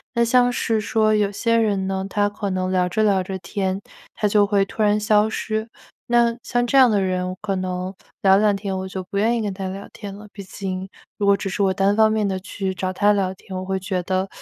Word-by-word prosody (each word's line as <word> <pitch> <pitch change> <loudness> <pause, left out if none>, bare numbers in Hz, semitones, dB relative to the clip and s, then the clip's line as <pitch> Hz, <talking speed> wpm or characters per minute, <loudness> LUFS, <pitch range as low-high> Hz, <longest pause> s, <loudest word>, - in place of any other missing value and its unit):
那 235 - +3
像 245 +1 +4
是 225 -3 0
说 215 0 +2
有 205 -1 +1
些 230 +3 0
人 205 -4 +1
呢， 190 0 -2
他 205 +1 +1
可 205 -1 -4
能 185 0 -1
聊 180 -1 +2
着 215 +4 +1
聊 195 -3 +2
着 190 0 -5
天， 190 +2 -3 0.3
他 210 - 0
就 205 0 +4
会 200 -1 +2
突 215 - -3
然 210 0 +3
消 210 0 +3
失。 220 +1 -3 0.4
那 235 0 +3
像 245 -1 0
这 275 - +2
样 255 -4 +7
的 205 - +2
人， 185 -1 -1
我 185 - -6
可 200 -2 -1
能 185 0 -3 0.3
聊 190 -1 +6
两 210 0 +3
天， 195 -1 -3
我 190 - -4
就 190 0 -5
不 200 +2 -5
愿 230 +3 +2
意 - - -1
跟 205 -2 -2
他 190 0 -4
聊 195 +1 -7
天 200 -3 -8
了， 210 +1 -11
毕 200 - -8
竟 190 0 -5 0.3
如 205 - -1
果 200 0 +5
只 - - -4
是 195 +1 -1
我 190 -1 +2
单 195 +2 +2
方 220 0 +4
面 215 -2 +1
地 190 -1 -1
去 190 -1 -4
找 185 +1 -2
他 205 +2 +3
聊 190 -2 0
天， 190 0 -10
我 185 - -4
会 190 0 -2
觉 185 -1 -2
得， 185 +2 -1
200 Hz, 270 characters per minute, -22 LUFS, 190-215 Hz, 0.4 s, 样